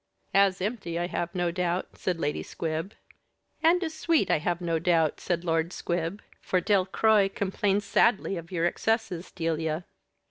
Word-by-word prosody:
_" - - -53 0.3
"As 195 -2 +4
empty, 195 -5 -3
I 175 - 0
have 175 0 -3
no 175 -1 +1
doubt," 180 0 -1
said 180 -3 -2
Lady 150 -1 -1
Squib. 165 +4 -4 0.7
"And 345 +3 +4
as 320 -2 -3
sweet, 320 0 +1
I - - +3
have 175 +2 -1
no 165 -2 0
doubt," 165 -2 +2
said 175 -1 -1
Lord 165 0 0
Squib; 175 +2 -3 0.2
"for 185 - +1
Delcroix 200 +2 +3
complains 200 +1 0
sadly 200 -1 +2
of 170 0 -8
your 170 -2 0
excesses, 205 -2 -1
Delia." 165 -1 -2
180 Hz, 165 wpm, -27 LUFS, 165-200 Hz, 0.7 s, As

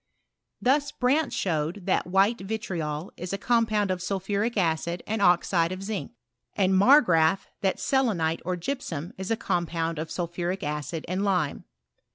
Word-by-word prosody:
Thus, 285 +3 +2
Brandt 275 +5 +1
showed 170 +2 -2
that 190 - +1
v>kite 195 +5 +2
vitriol 185 -6 -4
is 180 +2 -5
a - - 0
com 230 +2 +2
pound 210 -3 +1
of 185 -1 -2
sulphuric 200 +5 -1
acid 170 -1 0
and 220 0 -2
oxide 175 -2 +3
of 185 +1 -5
zinc; 195 - -4 0.4
and 190 -1 +2
Mar 260 +10 +7
graaf, 165 - +2 0.2
that 195 -2 +1
s'leaile 195 -12 +1
or 180 +2 -1
gypsum 175 - -4
is 190 - -4
a 225 - +1
compound 165 -5 -1
of 160 +1 -4
sulphuric 175 +2 -3
acid 150 +2 -3
anri 185 +3 -1
lime. 180 -8 0
185 Hz, 160 wpm, -26 LUFS, 170-210 Hz, 0.4 s, Mar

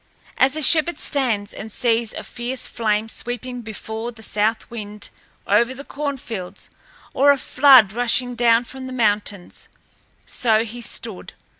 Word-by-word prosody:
As 265 +2 +4
a 310 - -1
shepherd 330 +4 +5
stands 230 -8 -1
and 220 +1 -8
sees 230 -1 0
a - - -6
fierce 245 +1 -5
flame 215 -1 -1
sweeping 245 +2 -4
before 220 +1 -6
the 220 -2 -14
south 215 +2 0
wind 210 -2 -8 0.3
over 235 +6 +2
the 280 - -8
corn 285 -1 -4
fields 200 -8 -8 0.4
or 280 +2 +4
a 285 - +6
flood 260 -7 +6
rushing 245 +1 0
down 235 -1 +3
from 260 +1 -9
the 260 - -7
mountains, 205 -5 -1 0.6
so 225 -2 +1
he 235 +2 -8
stood. 220 -2 -5
235 Hz, 150 wpm, -21 LUFS, 215-255 Hz, 0.6 s, a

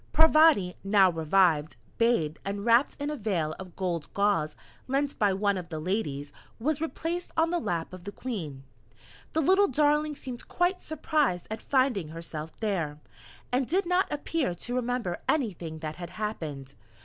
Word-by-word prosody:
Parvati, 310 - +6
now 195 -2 +5
revived, 160 -1 +2 0.2
bathed, 230 -10 +2
and 200 +1 -4
wrapped 235 +3 +4
in 290 +1 -2
a - - -2
veil 180 - -1
of 185 -2 -9
gold 175 -5 -2
gauze 200 -7 +2 0.3
lent 275 +2 -1
by 205 -2 +4
one 200 0 +1
of 175 -1 -9
the 160 -2 -4
Ladies, 150 -6 -2 0.2
was 300 +5 -1
replaced 330 +2 -3
on 325 +1 +3
the 350 - +1
lap 170 - -2
of 180 -1 -10
the 200 - -4
Queen. 170 - -5 0.7
The 320 - +2
little 385 +6 +5
darling 300 +2 +2
seemed 255 -3 -7
quite 355 +1 +1
surprised 300 - 0
at 220 - -4
finding 255 - +1
herself 160 -1 -7
there, 170 -9 -1 0.5
and 250 0 +1
did 370 +4 +1
not 360 +2 +2
appear 295 - -1
to 240 +8 -4
remember 245 -7 -1
anything 180 - -1
that 155 -1 -5
had 175 -2 -6
happened. 155 -11 -5
205 Hz, 160 wpm, -28 LUFS, -, 0.7 s, Parvati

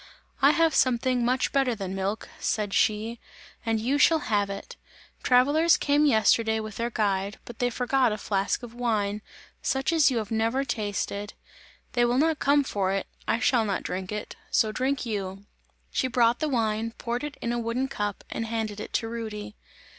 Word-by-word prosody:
"I - - +7
have 330 -1 +3
something 250 0 +2 0.3
better 270 -4 +2
than 195 -3 -5
milk," 195 +3 -2
said 210 -3 -1
she, 220 +2 +1 0.4
"and 225 -1 0
you 260 +6 0
shall 325 +2 +6 0.2
have 205 -1 +2
it! 200 0 -7 0.5
Travellers 290 +7 +4
came 290 +1 +3
yesterday 220 -2 +3
with 215 -1 -6
their 235 +1 -1
guide, 200 -3 -1
but 240 - -10
they 245 - +2
forgot 250 0 +1
a 210 - -2
flask 200 +4 -1
of 235 -1 -8
wine, 215 -4 -1 0.4
such 270 +5 0
as 320 -3 +5
you 255 - -1
have 215 -2 -3
never 225 +5 +1
tasted; 205 -3 -3 0.6
they 240 - +3
will 240 +1 +2
not 315 +2 +2
come 285 +1 +4
for 195 -7 -1
it, 195 0 -1 0.2
I - - +2
shall 245 -1 +3
not 200 -3 -2
drink 185 +1 -4
it, 210 0 -5
so 220 - +2
drink 260 +4 -1
you!" 200 -3 -4 0.5
She 260 - 0
brought 235 -1 +3
the 310 - 0
wine, 225 -2 0
poured 240 +3 -3
it 295 -1 -5
in 235 - -2
a 240 - -1
wooden 235 +3 -1
cup 205 -6 -3
and 225 - -3
handed 220 -2 -3
it - - -7
to 225 - 0
Rudy. 220 -2 -6
230 Hz, 185 wpm, -27 LUFS, 210-255 Hz, 0.6 s, I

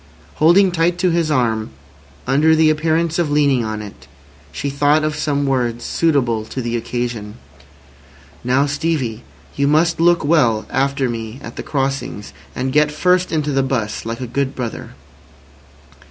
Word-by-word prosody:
Holding 180 +5 +5
tight 170 +1 +1
to 180 0 +1
his 165 -2 +1
arm, 115 -6 0 0.6
under 150 +5 +3
the 155 -1 +4
appearance 160 +2 0
of 170 -3 +1
leaning 140 -4 +2
on 110 -1 -4
it, 70 -10 -12 0.4
she 140 - -4
thought 145 +2 +2
of 155 0 -1
some 145 -2 -1
words 120 -3 -1
suitable 130 -9 +1
to 120 - -7
the 120 -1 -2
occasion. 120 -2 -4 1.1
"Now, 130 +3 +2
Stevie, 145 -6 -2 0.3
you 140 0 +1
must 165 +3 +2
look 170 -2 +3
well 125 -9 +2
after 135 0 0
me 115 +1 -5
at - - -9
the - - -5
crossings, 135 - -3 0.2
and 130 0 -2
get 150 0 +3
first 180 +4 +1
into 150 -2 -1
the 135 -1 +2
'bus, 125 -5 -2
like 115 +2 -5
a - - -3
good 135 +3 -2
brother." 120 - -6
140 Hz, 155 wpm, -19 LUFS, 120-155 Hz, 1.1 s, Holding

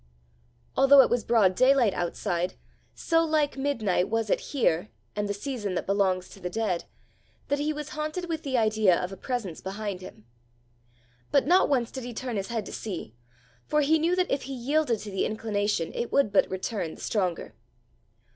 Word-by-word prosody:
Although 275 +1 +8
it - - -1
was 240 -2 +1
broad 215 -6 +4
daylight 255 -2 +4
outside, 175 +1 -2 0.4
so 330 0 +2
like 310 -2 +1
midnight 225 -10 0
was 225 -1 0
it - - +3
here 165 - +1 0.3
and 205 0 -2
the - - 0
season 210 -4 -4
that - - -2
belongs 190 -2 +1
to - - -13
the 180 - -4
dead, 190 -3 -1 0.6
that 285 - +1
he 300 +1 0
was 300 0 -5
haunted 310 +4 -4
with 325 -2 -3
the 265 -4 -1
idea 215 -5 +3
of 180 - -3
a - - -6
presence 225 -8 -4
behind 195 -1 -4
him. 110 - -12 1.1
But 280 - +4
not 360 +5 +4
once 245 -5 +1
did 260 - -6
he 240 -1 -7
turn 250 -1 -4
his 195 -1 -3
head 225 -3 -3
to - - -8
see, 180 - -6 0.5
for 300 - +2
he 310 +3 +3
knew 335 +3 +2
that 365 0 0
if 275 - +1
he 270 - -4
yielded 265 0 +1
to 210 - -7
the 190 - 0
inclination, 205 -5 -1
it 235 - -3
would 280 -7 +3
but - - +4
return 190 -2 -3
the - - -13
stronger. 185 -6 -2
225 Hz, 190 wpm, -27 LUFS, 195-280 Hz, 1.1 s, Although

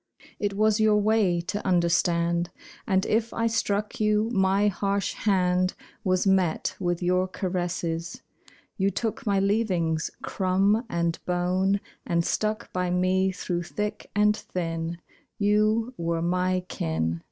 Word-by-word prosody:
It 205 -1 -1
was 215 +1 +3
your 215 -1 +4
way 210 -5 +2
to 200 +5 -4
understand. 170 -1 +2 0.4
And 190 -2 +2
if 225 +1 +1
I 230 - 0
struck 210 -2 -1
you, 215 +1 +2
my 195 0 +3
harsh 200 0 0
hand 185 -2 +1 0.3
Was 185 -2 +1
met 190 -4 +1
with 175 0 -1
your 180 +1 +2
caresses. 175 -3 -3 0.5
You 195 -1 +2
took 225 +5 -3
my 200 -1 +3
leavings, 190 -6 +1
crumb 195 +4 +1
and 170 -2 -1
bone, 185 +3 +1 0.2
And 170 0 0
stuck 215 0 -2
by 180 -1 0
me 185 +1 +2
through 175 -1 -3
thick 210 +4 -4
and 210 0 +4
thin 165 -4 -4 0.4
You 215 +3 +2
were 165 0 -1
my 180 +1 +1
kin. 80 - -2
185 Hz, 130 wpm, -26 LUFS, 175-210 Hz, 0.5 s, your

